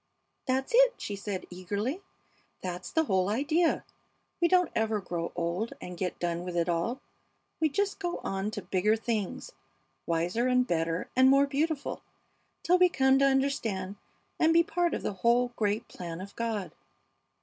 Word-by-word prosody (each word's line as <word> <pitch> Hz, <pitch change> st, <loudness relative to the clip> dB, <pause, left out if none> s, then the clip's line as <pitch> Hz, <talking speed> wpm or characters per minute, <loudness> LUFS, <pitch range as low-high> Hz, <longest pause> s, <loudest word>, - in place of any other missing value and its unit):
"That's 265 Hz, +1 st, 0 dB
it," -, -, +6 dB
she 205 Hz, -, -5 dB
said, 200 Hz, -1 st, -4 dB
eagerly. 205 Hz, -, -3 dB, 0.6 s
"That's 180 Hz, -1 st, -4 dB
the 320 Hz, -, +2 dB
whole 190 Hz, -8 st, +1 dB
idea. 310 Hz, +9 st, +1 dB, 0.6 s
We 340 Hz, -, +5 dB
don't 360 Hz, -1 st, +3 dB
ever 220 Hz, -1 st, +1 dB
grow 175 Hz, -3 st, -4 dB
old 175 Hz, +6 st, -2 dB
and 180 Hz, -, -7 dB
get 180 Hz, 0 st, -3 dB
done 170 Hz, 0 st, -2 dB
with 180 Hz, -1 st, -4 dB
it 170 Hz, 0 st, +1 dB
all, 175 Hz, +9 st, -1 dB, 0.6 s
we 315 Hz, -, +3 dB
just 400 Hz, +8 st, -1 dB
go 350 Hz, -3 st, -2 dB
on 195 Hz, +1 st, -2 dB
to 215 Hz, -2 st, -6 dB
bigger 205 Hz, +3 st, +2 dB
things, 225 Hz, -, -3 dB, 0.6 s
wiser 175 Hz, +9 st, 0 dB
and 250 Hz, 0 st, +3 dB
better 165 Hz, -4 st, -1 dB
and 260 Hz, +1 st, +6 dB
more 275 Hz, +1 st, +6 dB
beautiful, 290 Hz, +1 st, -2 dB, 0.6 s
till 360 Hz, +1 st, +4 dB
we 360 Hz, 0 st, +6 dB
come 265 Hz, -3 st, +3 dB
to 275 Hz, -, +5 dB
understand 235 Hz, -8 st, 0 dB, 0.4 s
and 320 Hz, 0 st, +4 dB
be 335 Hz, -, +7 dB
a -, -, -3 dB
part 345 Hz, +1 st, 0 dB
of -, -, -5 dB
the -, -, -2 dB
whole 235 Hz, +6 st, +2 dB
great 210 Hz, +1 st, 0 dB
plan 170 Hz, -2 st, -7 dB
of 195 Hz, +2 st, -9 dB
God!" 225 Hz, -4 st, -3 dB
225 Hz, 170 wpm, -29 LUFS, 185-280 Hz, 0.6 s, be